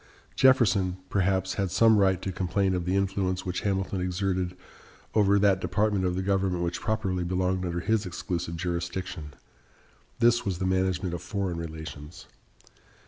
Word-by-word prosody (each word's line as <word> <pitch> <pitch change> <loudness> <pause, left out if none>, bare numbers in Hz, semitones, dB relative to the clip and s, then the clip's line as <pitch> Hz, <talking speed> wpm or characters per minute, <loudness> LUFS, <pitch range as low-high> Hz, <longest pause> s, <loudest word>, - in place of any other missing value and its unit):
Jefferson, 100 -8 +4
perhaps, 95 -1 +1
had 95 -1 -1
some 110 +3 +5
right 95 -2 +2
to 95 - -2
complain 95 +1 0
of 90 -2 -2
the 90 +2 0
influence 95 -1 0
which 90 -1 -2
Hamilton 95 -1 -1
exerted 90 0 -1 0.6
over 100 -2 +4
that 100 -2 +3
department 105 -2 +1
of 90 -1 0
the 95 - -1
government 95 -2 0
which 85 0 -2
properly 100 -5 -1
belonged 90 +1 0
under 85 -1 -2
his 110 0 0
exclusive 85 -2 -4
jurisdiction. 85 -3 -4 0.8
This 120 +1 +4
was 95 -5 -2
the 95 - -2
management 95 -1 0
of 85 - -4
foreign 95 -4 -3
relations. 80 -1 -8
95 Hz, 150 wpm, -27 LUFS, 90-100 Hz, 0.8 s, some